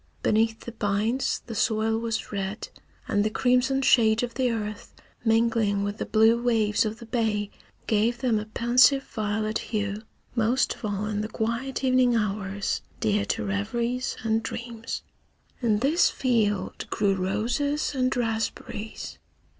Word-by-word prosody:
Beneath 225 +1 +2
the 235 - -7
pines 220 +3 0
the 230 - -6
soil 220 0 +1
was 230 -1 -3
red, 200 +1 -4 0.4
and 205 - +2
the 215 - +1
crimson 250 +4 +2
shade 225 -2 +4
of 240 -1 -3
the 255 -2 +1
earth 215 -2 -4 0.3
mingling 225 -3 +2
with 205 +1 -3
the - - -3
blue 225 +2 +4
waves 220 -3 +2
of 215 +1 -3
the 235 - -11
bay 220 -3 -1 0.3
gave 225 +2 +2
them 240 -4 +1
a 210 - -5
pensive 245 +5 +4
violet 215 -1 -2
hue, 205 -1 -3 0.3
most 240 +3 +2
of - - -8
all 205 0 -2
in 210 -1 -2
the 215 - -3
quiet 235 +5 -2
evening 255 -2 +4
hours 200 -2 -1 0.2
dear 210 -1 +1
to 225 -1 -2
reveries 235 +6 -2
and 225 0 +1
dreams. 230 0 -5 0.6
In 225 -4 +2
this 280 +10 +3
field 215 -7 0
grew 200 -2 +1
roses 235 +11 -1
and 255 -1 +1
raspberries. 225 -2 -3
225 Hz, 145 wpm, -26 LUFS, 210-240 Hz, 0.6 s, shade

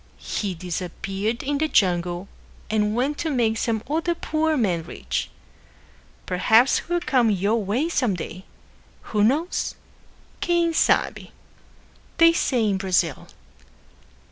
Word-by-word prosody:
He 195 -4 -3
disappeared 195 +5 -4
in 285 +1 -1
the 315 - +1
jungle 175 - +1 0.4
and 210 0 +1
went 275 +5 -1
to 325 - -1
make 230 -5 +1
some 225 -2 -1
other 330 +4 0
poor 315 -1 0
man 185 -9 +1
rich. 160 - -4 1.0
Perhaps 220 +8 +4
he - - -11
will 350 0 +1
come 250 -8 +2
your 205 +3 +1
way 230 +11 0
some 250 - 0
day. 180 +2 -7 0.7
Who 210 -1 +3
knows? 300 - 0 0.7
"Quem 340 -1 +2
sabe?" - - +1 0.9
they 330 0 +7
say 245 -8 +1
in 195 -2 +1
Brazil. 180 -6 0
225 Hz, 125 wpm, -23 LUFS, 190-295 Hz, 1.0 s, they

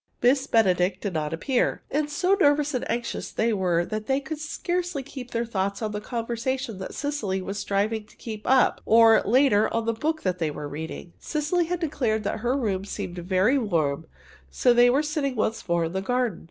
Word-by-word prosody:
Miss 265 +2 +3
Benedict 185 -4 +2
did 200 -2 -4
not 155 -2 -2
appear, 240 +10 0
and 295 +1 0
so 360 +6 +1
nervous 295 -5 +3
and 250 - -2
anxious 235 0 -3
were 190 -7 +1
they - - -14
that 215 0 -4
they 270 0 +2
could 295 +2 -6
scarcely 350 0 -3
keep 260 -2 -9
their 235 0 -1
thoughts 200 -3 -2
on 215 -2 -2
the 210 0 -4
conversation 235 0 -3
that 190 - -6
Cecily 285 -11 -2
was 195 +2 -5
striving 210 +2 -1
to - - -21
keep 215 -2 -7
up 260 -1 +3
or, 225 0 +6
later, 235 -2 +4
on 230 0 -1
the 230 - +1
book 315 +7 -2
they 180 -4 0
were 150 0 -6
reading. 160 +3 -7
Cecily 320 +3 0
had 355 +1 -2
declared 245 -10 -1
that 210 - -2
her 245 +4 0
room 200 -7 -1
seemed 180 -3 -5
very 190 +9 +2
warm, 160 - -1 0.4
so 240 - +3
they 240 0 +6
were 275 +5 +3
sitting 295 -3 -1
once 220 -3 -2
more 170 -1 +2
in 165 - -4
the 190 - -1
garden. 245 +2 -1
230 Hz, 200 wpm, -25 LUFS, 195-275 Hz, 0.4 s, or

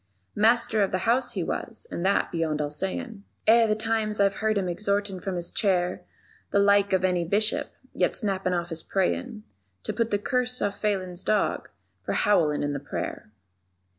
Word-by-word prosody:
Master 220 0 +3
of 195 - +1
the 185 -1 -1
House 240 +2 +2
he - - -2
was, - - -4
and 170 - -3
that 195 +1 +2
beyond 160 -3 -1
all 145 -1 -2
sayin', 200 - -3 0.2
Eh, 230 +1 +6
the 215 - +2
times 220 -1 0
I've 195 -1 +3
heard 220 0 +1
him 190 -2 0
exhortin' 200 +1 -1
from 190 0 -4
his 175 -1 0
chair 180 -4 +1 0.5
The - - +1
like 200 0 +4
of 190 -1 +2
any 180 -2 +1
Bishop, 205 +5 0 0.2
yet - - +1
snappin' 195 -4 -1
off 175 0 -2
his 165 -1 -1
prayin' 215 +4 -2 0.4
_To - - -3
put 230 -1 0
the 205 - +1
curse 250 +4 -1
on 205 - 0
Phelan's 190 -4 -2
dog 215 - 0 0.3
for - - -2
howlin' 160 -9 +2
in 145 0 -1
the 140 - -3
prayer. - - -5
200 Hz, 185 wpm, -26 LUFS, 180-215 Hz, 0.5 s, Eh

